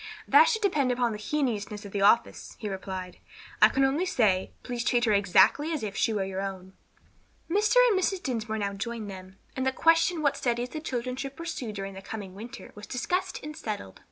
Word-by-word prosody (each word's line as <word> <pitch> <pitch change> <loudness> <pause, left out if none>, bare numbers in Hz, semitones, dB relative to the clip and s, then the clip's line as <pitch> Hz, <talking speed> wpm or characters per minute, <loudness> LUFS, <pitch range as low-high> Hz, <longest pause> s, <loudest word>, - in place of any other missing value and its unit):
"That - - +7
should 445 -3 0
depend 295 -10 +2
upon 245 -1 +1
the 210 - -5
heinousness 210 -5 -2
of 200 - -8
the 200 - -2
offence," 210 +4 +2
he 215 - -5
replied. 190 -2 -6 0.4
"I - - +9
can 270 - +1
only 290 +7 +1
say, 200 - +2
please 245 -2 -3
treat 240 -1 +2
her 215 - +3
exactly 205 - +4
as 310 -7 -2
if 200 -2 -4
she 230 - +1
were 205 -3 0
your 190 0 -4
own." 190 -1 -6 0.7
Mr. 415 +7 +2
and 410 -5 +3
Mrs. 375 0 -1
Dinsmore 225 -4 -2
now 200 -1 -2
joined 215 +1 -5
them, 190 0 -11 0.2
and 260 - -2
the 265 - +2
question 330 +3 +3
what 285 -1 +2
studies 240 0 -1
the 310 - -5
children 250 -4 -3
should 275 0 -5
pursue 325 -9 -5
during 195 -1 -6
the 190 - -9
coming 195 -2 -7
winter 220 +5 -9
was 210 0 -11
discussed 355 +9 -2
and 300 +1 -7
settled. 210 - -6
235 Hz, 210 wpm, -28 LUFS, 200-285 Hz, 0.7 s, I